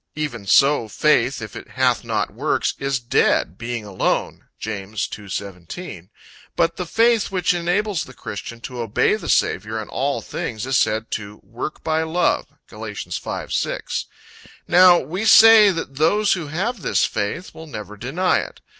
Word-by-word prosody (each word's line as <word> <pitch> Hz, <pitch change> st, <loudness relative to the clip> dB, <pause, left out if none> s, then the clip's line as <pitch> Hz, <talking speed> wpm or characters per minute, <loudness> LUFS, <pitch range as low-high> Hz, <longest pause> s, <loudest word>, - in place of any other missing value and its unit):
"Even 125 Hz, -9 st, -4 dB
so 135 Hz, 0 st, +4 dB
faith, 125 Hz, 0 st, +2 dB
if 105 Hz, -, -9 dB
it -, -, -8 dB
hath -, -, +1 dB
not -, -, -1 dB
works, -, -, 0 dB
is 135 Hz, -1 st, -1 dB
dead, 120 Hz, -7 st, +1 dB
being 115 Hz, 0 st, -5 dB
alone." 100 Hz, -2 st, -2 dB
(James 105 Hz, -1 st, -4 dB
2: 100 Hz, -2 st, -9 dB
17.) 95 Hz, -, -7 dB, 0.5 s
But 165 Hz, 0 st, +1 dB
the 180 Hz, -, -4 dB
faith 230 Hz, +2 st, +3 dB
which 180 Hz, -2 st, +1 dB
enables 180 Hz, +2 st, 0 dB
the 130 Hz, -, -14 dB
christian 115 Hz, +2 st, -7 dB
to 125 Hz, 0 st, -7 dB
obey 115 Hz, -3 st, +2 dB
the -, -, -7 dB
Saviour 110 Hz, +4 st, +1 dB
in 110 Hz, -, -7 dB
all 140 Hz, +2 st, -1 dB
things, 110 Hz, 0 st, -5 dB
is 130 Hz, 0 st, -1 dB
said 110 Hz, +1 st, 0 dB
to 105 Hz, -1 st, -5 dB
"work 115 Hz, +9 st, -7 dB
by 160 Hz, 0 st, +1 dB
love." 165 Hz, +2 st, 0 dB, 0.2 s
(Gal. -, -, -7 dB
5: -, -, -5 dB
6.) -, -, -2 dB, 0.6 s
Now 180 Hz, 0 st, +7 dB
we 175 Hz, +8 st, -3 dB
say 220 Hz, -1 st, +8 dB
that 165 Hz, -7 st, -4 dB
those 200 Hz, +7 st, +3 dB
who 170 Hz, -5 st, -4 dB
have 195 Hz, +9 st, -3 dB
this -, -, +2 dB
faith, 110 Hz, -, -3 dB
will 160 Hz, -, -11 dB
never 105 Hz, -7 st, -8 dB
deny 150 Hz, -, 0 dB
it. -, -, -7 dB
135 Hz, 165 wpm, -21 LUFS, 110-180 Hz, 0.6 s, say